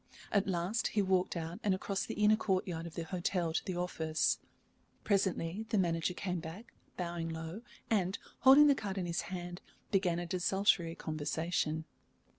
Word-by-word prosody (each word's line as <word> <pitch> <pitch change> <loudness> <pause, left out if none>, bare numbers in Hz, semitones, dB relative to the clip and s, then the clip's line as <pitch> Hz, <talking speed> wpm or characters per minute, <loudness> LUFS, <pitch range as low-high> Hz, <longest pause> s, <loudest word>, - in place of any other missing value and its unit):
At 200 -1 +2
last 190 +4 0
he 205 - +1
walked 185 -2 +1
out 165 +1 -4
and 200 -2 +3
across 195 +1 -2
the - - -4
inner 210 +1 +5
courtyard 185 -5 -1
of 165 - -10
the 170 - -2
hotel 175 -1 -1
to - - 0
the 185 - -3
office. 160 -3 0 0.6
Presently 195 0 0
the 225 - +1
manager 170 -1 +1
came 180 -2 -2
back, 170 +8 -9 0.2
bowing 170 -2 -3
low, 165 +5 -5 0.3
and, 195 -3 +1 0.2
holding 270 +4 +8
the 290 - +7
card 205 -6 -4
in 185 - -1
his 170 0 -1
hand, 175 -1 -5 0.3
began 185 -4 +2
a 175 - -2
desultory 180 -1 +2
conversation. 155 0 -1
180 Hz, 165 wpm, -33 LUFS, 165-195 Hz, 0.6 s, holding